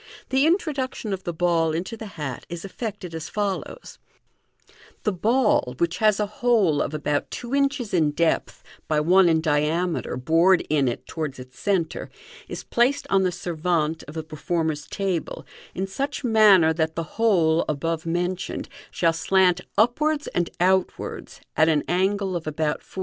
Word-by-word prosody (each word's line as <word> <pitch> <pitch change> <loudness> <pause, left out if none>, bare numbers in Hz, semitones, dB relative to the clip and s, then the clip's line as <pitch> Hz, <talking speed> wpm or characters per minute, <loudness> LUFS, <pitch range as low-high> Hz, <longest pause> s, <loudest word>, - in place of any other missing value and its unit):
The 265 +3 +3
introduction 285 - -1
of 190 -1 -6
the 175 - -1
ball 165 -1 +1
into 180 +8 -3
the 220 -1 -8
hat 135 -5 -5
is 170 +2 -6
effected 195 -4 -6
as 160 -1 -6
follows: 205 - -4 0.5
— - - -27
The 210 - +1
ball, 210 - +1
which 170 +2 -1
has 215 -2 +3
a 210 - +2
hole 205 -8 +2
of 155 - -2
about 150 -1 -1
two 240 +1 -6
inches 275 -5 0
in 160 -4 +3
depth 160 +3 -1 0.2
by 155 -1 +2
one 180 +4 +5
in 160 -1 +3
diameter 160 +3 0
bored 165 +7 +3
in 145 -3 +3
it 120 - -3
towards 155 -4 -4
its 125 -1 -12
centre, 180 -5 -1 0.4
is - - -6
placed 245 +4 +1
on 195 - +4
the 185 - +2
servavte 165 -2 -1
of 150 - -10
thf 160 -1 -5
performer's 155 -1 -2
table 190 -5 -3 0.3
in 190 - -1
such 275 +10 -4
manner 210 -8 +6
that 160 0 -1
the 165 - -2 0.2
hole 170 -7 +3
above 160 +2 -2
mentioned 175 +2 -3 0.2
shall 165 -1 +1
slant 180 +1 +3 0.2
upwards 290 +7 +2
and 175 -1 -1
outwards, 185 +1 -1
at 155 - +4
^n 155 -2 +2
angle 190 +1 0
of 165 -2 -4
about 155 0 -1
450. - - -11
175 Hz, 165 wpm, -24 LUFS, 160-205 Hz, 0.5 s, manner